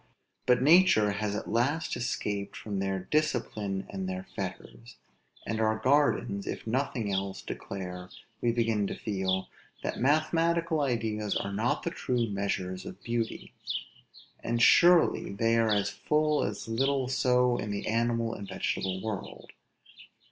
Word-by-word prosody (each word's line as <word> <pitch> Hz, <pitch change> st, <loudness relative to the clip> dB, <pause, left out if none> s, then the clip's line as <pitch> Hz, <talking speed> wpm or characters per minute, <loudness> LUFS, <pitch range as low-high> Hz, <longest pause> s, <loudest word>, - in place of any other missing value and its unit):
But 125 Hz, 0 st, +4 dB
nature 160 Hz, -, +6 dB
has 105 Hz, 0 st, -2 dB
at -, -, -4 dB
last 140 Hz, +8 st, 0 dB
escaped 105 Hz, -5 st, -3 dB
from 100 Hz, -3 st, -4 dB
their 95 Hz, -1 st, -1 dB
discipline 110 Hz, -10 st, 0 dB
and 95 Hz, -1 st, -4 dB
their 95 Hz, 0 st, -4 dB
fetters; 105 Hz, +5 st, -7 dB, 0.5 s
and 110 Hz, +2 st, -2 dB
our 110 Hz, 0 st, +2 dB
gardens, 130 Hz, -7 st, +2 dB
if -, -, -4 dB
nothing 115 Hz, -3 st, -1 dB
else, 95 Hz, 0 st, -2 dB
declare, 90 Hz, -2 st, -6 dB, 0.3 s
we 120 Hz, -, +2 dB
begin 115 Hz, -3 st, +1 dB
to -, -, -4 dB
feel 95 Hz, -2 st, -1 dB, 0.4 s
that -, -, -3 dB
mathematical 160 Hz, +3 st, +2 dB
ideas 110 Hz, -5 st, -1 dB
are 100 Hz, -, -2 dB
not 110 Hz, +4 st, 0 dB
the -, -, -2 dB
true 125 Hz, -2 st, 0 dB
measures 95 Hz, -2 st, -2 dB
of -, -, -10 dB
beauty. 115 Hz, -1 st, -3 dB, 0.9 s
And 120 Hz, 0 st, 0 dB
surely 170 Hz, -, +5 dB
they 115 Hz, +3 st, +2 dB
are 105 Hz, -3 st, +3 dB
full 150 Hz, 0 st, +1 dB
as 100 Hz, +1 st, -4 dB
little 135 Hz, +3 st, +1 dB
so 125 Hz, -1 st, +2 dB
in 105 Hz, -, -4 dB
the 100 Hz, 0 st, -3 dB
animal 115 Hz, +1 st, +1 dB
as 100 Hz, -3 st, -7 dB
the -, -, -7 dB
vegetable 95 Hz, 0 st, -2 dB
world. 110 Hz, -3 st, -6 dB
115 Hz, 140 wpm, -29 LUFS, 100-125 Hz, 0.9 s, nature